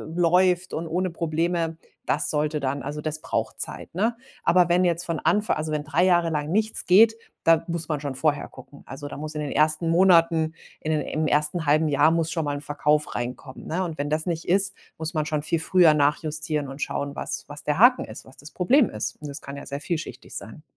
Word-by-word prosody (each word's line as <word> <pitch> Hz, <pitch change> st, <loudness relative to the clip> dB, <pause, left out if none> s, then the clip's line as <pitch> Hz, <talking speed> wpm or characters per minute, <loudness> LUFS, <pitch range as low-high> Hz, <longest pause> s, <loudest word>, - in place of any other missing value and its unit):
läuft 180 Hz, +1 st, +2 dB
und 165 Hz, +1 st, -3 dB
ohne 180 Hz, +2 st, -1 dB
Probleme, 165 Hz, 0 st, -1 dB, 0.3 s
das 150 Hz, +2 st, +1 dB
sollte 150 Hz, 0 st, 0 dB
dann 140 Hz, 0 st, -2 dB
also, 145 Hz, +3 st, -5 dB
das 155 Hz, 0 st, -2 dB
braucht -, -, -3 dB
Zeit, -, -, -5 dB
ne? 220 Hz, +7 st, 0 dB, 0.3 s
Aber 180 Hz, -1 st, +4 dB
wenn 175 Hz, +1 st, +3 dB
jetzt 175 Hz, 0 st, +1 dB
von 165 Hz, -2 st, -2 dB
Anfa 205 Hz, +6 st, +1 dB
also, 155 Hz, 0 st, -3 dB
wenn 150 Hz, -1 st, -1 dB
3 160 Hz, +3 st, +1 dB
Jahre 175 Hz, -2 st, +3 dB
lang 150 Hz, 0 st, -2 dB
nichts 215 Hz, +3 st, 0 dB
geht, 220 Hz, +5 st, +6 dB, 0.3 s
da 165 Hz, 0 st, +5 dB
muss 170 Hz, -2 st, -3 dB
man 150 Hz, -3 st, -2 dB
schon 140 Hz, -2 st, -5 dB
vorher 145 Hz, +2 st, 0 dB
gucken. 135 Hz, +2 st, -15 dB
Also, 145 Hz, +2 st, -7 dB
da -, -, -8 dB
muss 155 Hz, +1 st, -6 dB
in 150 Hz, -, -2 dB
den 145 Hz, -, -4 dB
ersten 155 Hz, +2 st, +2 dB
Monaten 165 Hz, -3 st, +4 dB, 0.3 s
in 155 Hz, -, -3 dB
d 155 Hz, -, -2 dB
im 155 Hz, 0 st, 0 dB
ersten 150 Hz, +3 st, +1 dB
1/2 155 Hz, +2 st, +3 dB
Jahr 145 Hz, +1 st, +4 dB
muss 165 Hz, 0 st, 0 dB
schon 165 Hz, -3 st, -2 dB
mal 145 Hz, 0 st, -2 dB
'n 145 Hz, -, -8 dB
Verkauf 150 Hz, +1 st, 0 dB
reinkommen, 125 Hz, +2 st, -6 dB
ne? 180 Hz, +4 st, -1 dB
Und 165 Hz, -3 st, -5 dB
wenn 145 Hz, -, -2 dB
das 155 Hz, +1 st, 0 dB
nicht 170 Hz, -2 st, -3 dB
ist, 195 Hz, +1 st, +5 dB, 0.2 s
muss 160 Hz, +1 st, -2 dB
man 155 Hz, -2 st, 0 dB
schon 150 Hz, -1 st, -2 dB
viel 160 Hz, +2 st, 0 dB
früher 170 Hz, -1 st, +5 dB
nachjustieren 150 Hz, 0 st, 0 dB
und 135 Hz, +2 st, -9 dB
schauen, 140 Hz, 0 st, -3 dB
was -, -, -4 dB
was 145 Hz, +1 st, -8 dB
der 150 Hz, -, -1 dB
Haken 245 Hz, +5 st, +5 dB
ist, -, -, -10 dB
was 130 Hz, -, -15 dB
das 145 Hz, +3 st, -10 dB
Problem 240 Hz, +7 st, +3 dB
ist? 110 Hz, +1 st, -3 dB
Und 150 Hz, -, -6 dB
das 140 Hz, 0 st, -6 dB
kann 140 Hz, -, -8 dB
ja 140 Hz, -, -8 dB
sehr 140 Hz, +1 st, -5 dB
vielschichtig 165 Hz, 0 st, -5 dB
sein. -, -, -9 dB
155 Hz, 230 wpm, -24 LUFS, 150-175 Hz, 0.3 s, geht